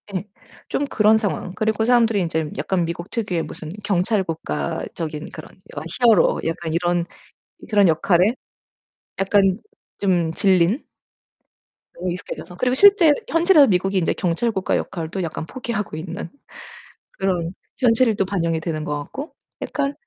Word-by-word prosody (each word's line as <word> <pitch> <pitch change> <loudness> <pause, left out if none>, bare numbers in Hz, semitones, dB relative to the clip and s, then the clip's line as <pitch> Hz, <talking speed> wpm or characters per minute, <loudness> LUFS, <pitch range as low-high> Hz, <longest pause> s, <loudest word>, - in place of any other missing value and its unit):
예. 185 - -1 0.5
좀 290 - 0
그런 220 -5 +4
상황. 200 -4 -3
그리고 220 +2 0
사람들이 230 -4 +3
인제 160 -3 -2
약간 170 +5 0
미국 170 +2 -5
특유의 195 -8 -2
무슨 155 -1 -8
경찰국가적인 165 - -2
그런 155 - -10 0.3
여 - - -2 0.2
히어로 225 -7 +4
약간 165 -1 -3
이런 175 0 +1 0.6
그런 205 -3 +5
역할에 175 +5 +3 0.9
약간 195 -1 +3 0.4
좀 175 -5 +1
질린 190 - +2 1.1
너무 180 +1 -3
익숙해져서. 180 0 -7
그리고 250 +5 +1
실제 390 -2 +7 0.2
현실에서 330 -3 +5
미국이 195 0 +1
이제 175 - +1
경찰국가 190 +3 0
역할도 170 +2 -4
약간 160 -1 -4
포기하고 210 - -4
있는 170 +4 -6 0.8
그런 180 -3 -2 0.2
현실이 230 -2 +3
또 195 - 0
반영이 170 -4 -1
되는 160 -1 -3
것 150 -1 -2
같고 270 - -7 0.3
약간 280 -1 -2
185 Hz, 305 characters per minute, -22 LUFS, 165-220 Hz, 1.1 s, 실제